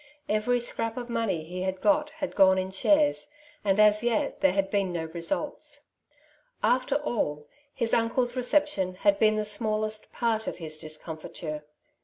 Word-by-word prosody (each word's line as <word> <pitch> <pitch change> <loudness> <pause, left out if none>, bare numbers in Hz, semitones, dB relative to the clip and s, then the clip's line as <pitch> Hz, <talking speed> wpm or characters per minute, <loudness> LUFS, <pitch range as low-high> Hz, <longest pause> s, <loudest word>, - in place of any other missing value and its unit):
Every 215 +4 +1
scrap 230 -1 -3
of 240 -1 -5
money 215 -9 -1
he 180 +3 -6
had 190 0 -2
got 300 +3 +2
had 310 -3 -5
gone 190 -1 +6
in 185 0 -2
shares, 295 +9 +2 0.3
and 200 0 +2
as 210 +1 +5
yet 235 -2 0
there 190 -1 +4
had 195 0 0
been 195 -3 +1
no 165 -2 -3
results. 290 - -4 0.7
After 255 +2 +2
all, 150 - -2 0.2
his 230 -4 -2
uncle's 240 +2 +2
reception 250 -8 +1
had 200 +1 +2
been 215 -1 +4
the 215 0 -1
smallest 215 0 -1
part 225 -2 -1
of - - -3
his 155 -2 -4
discomfiture. 155 0 -7
215 Hz, 160 wpm, -27 LUFS, 185-245 Hz, 0.7 s, gone